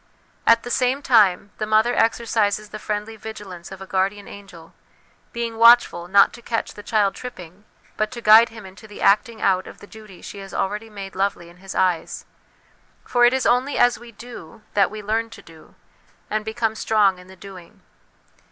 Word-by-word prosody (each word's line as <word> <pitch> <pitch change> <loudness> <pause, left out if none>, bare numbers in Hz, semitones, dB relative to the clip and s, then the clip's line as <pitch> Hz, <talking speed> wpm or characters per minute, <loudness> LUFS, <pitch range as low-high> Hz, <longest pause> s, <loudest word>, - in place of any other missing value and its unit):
At 230 0 +5
the 245 - -6
same 255 +3 0
time, 205 -4 +3
the 215 - -2
mother 220 +3 +3
exercises 215 -2 0
the 215 - -8
friendly 210 +1 -4
vigilance 200 -6 -10
of 190 0 -9
a - - -10
guardian 195 +2 -2
angel, 180 -5 -13 0.6
being 235 -1 -4
watchful, 230 -7 +5
not 200 +2 +5
to 240 - -12
catch 230 -1 -3
the 205 - -10
child 205 -2 +1
tripping, 190 -5 -10 0.3
but 215 0 0
to 240 - -7
guide 225 +1 +7
him 225 -2 -12
into 190 +3 -13
the 205 - -12
acting 220 +3 +2
out 185 -1 +1
of - - -12
the - - -14
duty 210 -3 -14
she 200 - -9
has 195 0 -10
already 210 +3 -3
made 195 -2 -9
lovely 190 -3 -2
in 175 - -18
his 190 +1 -10
eyes; 180 -3 -1 0.8
for 245 -1 +3
it 240 - +5
is 265 -1 0
only 255 +4 +1
as 245 -1 +3
we 240 0 -13
do 220 -4 -12
that 200 -1 +3
we 215 0 -8
learn 225 +2 -1
to 225 - -13
do, 160 -1 -18 0.6
and 215 0 -1
become 220 0 -1
strong 210 -4 +1
in 180 - -15
the 190 - -14
doing. 185 -2 -14
210 Hz, 190 wpm, -22 LUFS, 195-230 Hz, 0.8 s, guide